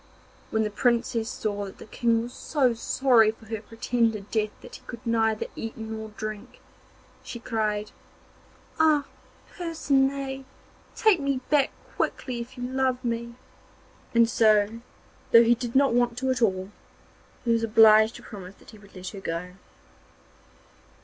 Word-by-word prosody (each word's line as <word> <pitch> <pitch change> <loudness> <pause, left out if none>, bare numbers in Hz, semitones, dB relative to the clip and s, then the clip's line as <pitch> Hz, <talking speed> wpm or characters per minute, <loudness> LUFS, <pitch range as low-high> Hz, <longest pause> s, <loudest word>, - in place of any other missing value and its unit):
When 220 0 +1
the 210 - -2
Princess 230 +1 +1
saw 205 -4 -3
that 195 - -10
the - - -11
King 230 +1 +1
was 240 +1 -8
so 265 -6 +1
sorry 235 -1 +3
for 225 +1 -7
her 220 -1 -5
pretended 225 -2 -1
death 215 -1 +1
that 245 - -10
he - - -22
could 235 +1 -9
neither 225 -2 +1
eat 225 0 -6
nor 220 -1 -6
drink, 215 +3 -6 0.6
she - - -7
cried: 215 -3 -2 0.9
'Ah, 305 -3 +4 0.5
Percinet! 275 -5 0 0.5
take 430 -6 +4
me 275 -2 0
back 290 -3 +4 0.3
quickly 250 -3 -2
if 235 +2 -8
you 245 - -5
love 260 0 -1
me.' 235 0 -3 0.8
And 230 0 +6
so, 220 0 +3 0.5
though 230 0 +9
he 235 +1 +5
did 240 0 -5
not 275 -2 +4
want 240 -1 +1
to 260 +1 0
at 250 -2 -1
all, 190 -3 +1 0.7
he 235 - +2
was 230 0 +2
obliged 220 0 +6
to - - -11
promise 195 -2 -10
that - - -17
he 215 - -14
would 200 -1 -18
let 185 0 -6
her 200 - -9
go. 170 0 -4
230 Hz, 155 wpm, -26 LUFS, 215-250 Hz, 0.9 s, though